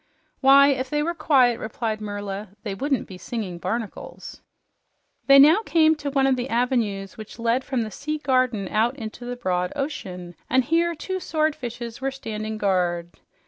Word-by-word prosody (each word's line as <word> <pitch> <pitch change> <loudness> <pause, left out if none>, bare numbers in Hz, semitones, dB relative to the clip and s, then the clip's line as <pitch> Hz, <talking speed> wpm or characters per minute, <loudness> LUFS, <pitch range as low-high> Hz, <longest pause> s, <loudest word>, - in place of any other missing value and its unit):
"Why, 275 +1 +7
if 260 -1 -1
they 295 +1 0
were 340 +2 -1
quiet," 270 -7 +3
replied 220 0 -3
Merla, 205 -1 -5
"they 205 -4 -3
wouldn't 270 +5 -1
be 185 -1 -10
singing 190 -4 -5
barnacles." 225 +3 -5 0.9
They 275 0 +8
now 310 +9 +7
came 320 -5 +4
to 290 -1 -4
one 275 -1 +2
of 270 -1 +3
the 250 +1 -3
avenues 225 -5 -1
which 215 - -9
led 235 +2 +1
from 255 -4 -1
the 215 - -6
sea 305 +7 -4
garden 255 -8 +1
out 230 +4 +1
into 230 -1 -8
the 245 0 -4
broad 180 -6 -1
ocean, 185 - -5 0.2
and 260 0 +3
here 335 +5 +1
two 375 +5 -4
swordfishes 255 -9 -3
were 270 - 0
standing 220 -5 -5
guard. 175 -4 -1
245 Hz, 170 wpm, -24 LUFS, 215-275 Hz, 0.9 s, They